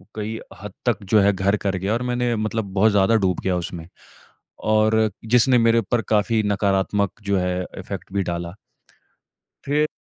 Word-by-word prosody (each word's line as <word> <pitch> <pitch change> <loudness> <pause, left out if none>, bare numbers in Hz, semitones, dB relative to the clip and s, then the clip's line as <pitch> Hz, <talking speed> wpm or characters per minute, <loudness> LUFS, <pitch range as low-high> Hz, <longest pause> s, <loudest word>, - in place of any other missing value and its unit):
कई 110 +1 -4 0.2
हद 105 0 -7
तक 120 -5 +2
जो 105 +2 +3
है, 100 0 +4
घर 95 +2 +1
कर 100 -2 -2
गया 95 +4 -1
और 115 - -1
मैंने 125 -1 0
मतलब 110 0 -2
बहुत 105 +3 +4
ज़्यादा 100 +2 +3
डूब 95 -5 +1
गया 95 -1 +1
उसमें, 85 -1 -6 0.7
और 110 0 +2
जिसने 125 +2 +4
मेरे 115 0 +4
ऊपर 115 +2 0
काफ़ी 110 +1 +2
नकारात्मक 100 0 +1
जो 100 -1 +1
है, 90 0 -1
अफ़ेक्ट 95 - -8
भी 100 0 0
डाला। 85 -1 -4 1.1
फिर 150 +2 +1
105 Hz, 170 wpm, -22 LUFS, 95-115 Hz, 1.1 s, है